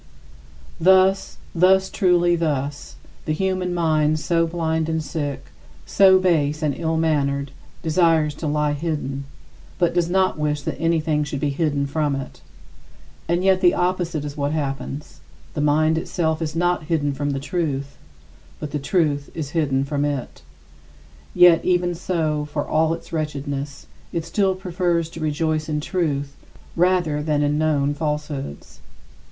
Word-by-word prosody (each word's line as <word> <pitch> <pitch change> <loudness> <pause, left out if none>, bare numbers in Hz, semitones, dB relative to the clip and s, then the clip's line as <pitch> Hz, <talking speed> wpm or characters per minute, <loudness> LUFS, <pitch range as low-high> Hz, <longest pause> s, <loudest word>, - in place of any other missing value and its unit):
Thus, 190 +2 +4 0.2
thus, 190 +2 +4
truly 175 -3 +3
thus: 145 -3 -2 0.3
the 155 - 0
human 185 +1 -1
mind 155 -3 +2
so 165 +2 +1
blind 160 -1 -1
and 160 -1 -1
sick, 145 -3 -4 0.3
so 190 -1 +6
base 155 -5 +1
and 150 -2 +1
ill 165 -1 -1
mannered, 140 -4 0 0.3
desires 160 -2 +3
to 160 - -1
lie 150 0 +1
hidden, 145 -3 -3 0.5
but 175 -2 +2
does 175 -1 +1
not 185 -3 +1
wish 150 -1 -1
that - - -4
anything 160 -2 +1
should 140 -1 -4
be 145 +1 0
hidden 145 -1 0
from 145 0 0
it. 135 -1 -7 0.9
And 175 +2 +1
yet 190 -1 +3
the 175 -2 +5
opposite 175 -4 -1
is 145 -1 -6
what 145 0 -1
happens 140 -1 -4 0.3
the 150 - -2
mind 155 +2 +3
itself 160 -1 -1
is 155 -1 -3
not 175 -1 +1
hidden 150 -3 0
from 145 +1 -2
the 135 -1 -1
truth, 140 -2 -3 0.6
but 150 - -5
the 150 - -2
truth 145 -2 0
is 150 -4 -4
hidden 140 -5 +1
from 140 +1 -1
it. 145 -3 -3 0.9
Yet 175 -2 +7
even 175 -1 +1
so, 160 -4 -1
for 145 0 -3
all 160 +1 +2
its - - -14
wretchedness, 145 -2 -4 0.3
it 165 -1 -3
still 190 +2 +1
prefers 175 -3 -1
to 165 - -9
rejoice 155 0 -1
in 150 -1 0
truth 145 -4 -2 0.4
rather 175 -4 +2
than 150 -1 0
in 145 +1 +1
known 145 -2 +1
falsehoods. 150 - -4
155 Hz, 150 wpm, -22 LUFS, 145-170 Hz, 0.9 s, Yet